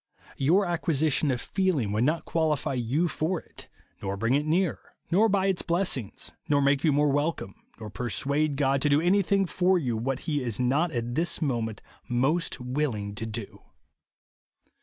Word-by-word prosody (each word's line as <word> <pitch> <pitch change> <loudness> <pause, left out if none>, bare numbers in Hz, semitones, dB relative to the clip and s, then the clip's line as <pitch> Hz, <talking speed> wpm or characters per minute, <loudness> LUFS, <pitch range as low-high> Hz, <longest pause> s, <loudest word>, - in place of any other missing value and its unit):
Your 175 +9 +3
acquisition 160 -4 +1
of 125 -2 0
feeling 175 - 0
would 110 +4 +1
not 160 +4 0
qua 160 -2 +1
lify 140 - -3
you 145 +10 +1
for 165 +2 -1
it, - - -14 0.3
nor 100 0 -3
bring 115 +5 +1
it 145 +2 +1
nearer, 175 +2 -1 0.2
nor 210 +6 +4
buy 195 -1 +2
its 195 -2 +1
blessings, 170 - -2 0.2
nor 145 -1 +4
make 140 0 +2
you 160 - +4
more 145 0 +3
wel 145 +4 +2
eome, 95 - -9 0.3
nor 110 -2 -8
persuade 140 +7 -1
God 135 -1 +2
to 145 - +2
do 145 +1 +4
anything 195 +3 +2
for 185 +1 +2
you 125 -9 -1
what 125 +4 -2
he 145 -3 -1
is 120 -3 -3
not 140 +7 +1
at 120 -2 -3
this 165 +6 +1
moment 115 - -2 0.3
most 135 +8 0
willing 125 -6 -2
to 115 +1 -5
do. 110 -1 -7
145 Hz, 180 wpm, -27 LUFS, 125-170 Hz, 0.3 s, nor